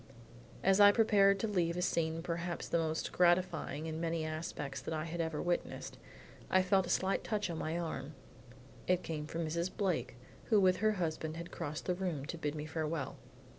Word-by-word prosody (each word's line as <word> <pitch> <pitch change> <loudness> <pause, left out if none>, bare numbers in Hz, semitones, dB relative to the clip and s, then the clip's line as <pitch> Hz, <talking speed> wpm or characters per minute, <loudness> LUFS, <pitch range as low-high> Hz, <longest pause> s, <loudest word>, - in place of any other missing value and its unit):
As 195 +1 +4
I 205 0 +10
prepared 205 -3 +5
to 225 - 0
leave 175 -4 0
a - - 0
scene 165 -1 0
perhaps 170 0 -3
the 170 - +1
most 160 0 -1
gratifying 175 -4 +2
in 160 0 -4
many 165 -1 -1
respects 155 -3 -4
that 160 - -3
I 155 - -2
had 170 +1 -3
ever 160 -2 -2
witnessed, 175 0 -2 0.5
I 185 0 +4
felt 185 0 +3
a - - -6
slight 190 +1 +1
touch 210 -4 -1
on 160 - -4
my 160 +2 -2
arm. 155 -4 -4 0.7
It 180 -1 +2
came 150 -2 -4
from 165 +1 -3
Mrs. 170 +3 -1
Blake 185 - -1 0.3
who 215 -3 +4
with 185 -1 +4
her 215 +2 +2
husband 160 -4 -2
had 170 +1 -7
crossed 150 +1 -5
the 180 - +1
room 175 -7 -3
to 170 +2 -5
bid 150 -1 -2
me 150 0 -4
farewell. 155 -2 -3
170 Hz, 195 wpm, -34 LUFS, 155-185 Hz, 0.7 s, I